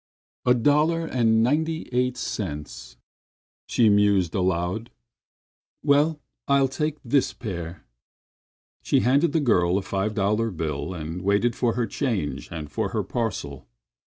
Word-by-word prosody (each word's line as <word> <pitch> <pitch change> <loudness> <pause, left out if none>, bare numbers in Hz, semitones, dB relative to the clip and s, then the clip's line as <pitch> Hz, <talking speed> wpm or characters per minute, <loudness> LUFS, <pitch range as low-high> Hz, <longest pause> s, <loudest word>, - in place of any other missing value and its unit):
"A 125 - +6
dollar 150 +7 +2
and 115 -6 +2
ninety 160 +5 0
eight 125 0 0
cents," 75 - -5 0.7
she 115 - +3
mused 100 -4 +3
aloud. 90 +4 -1 0.9
"Well, 150 +2 +3 0.3
I'll 140 -1 +4
take 150 +3 -2
this 130 +2 +2
pair." 85 -7 -6 1.0
She - - +2
handed 140 +6 +3
the 160 - +2
girl 90 - +2
a 100 - -2
five 100 +2 -2
dollar 105 +3 +1
bill 80 -2 -4
and 80 +2 -5
waited 100 +5 +1
for 120 -2 +1
her 120 -1 0
change 95 - -3
and 80 -3 -6
for 110 -3 -1
her 110 -2 0
parcel. 90 - -4
110 Hz, 130 wpm, -25 LUFS, 90-130 Hz, 1.0 s, A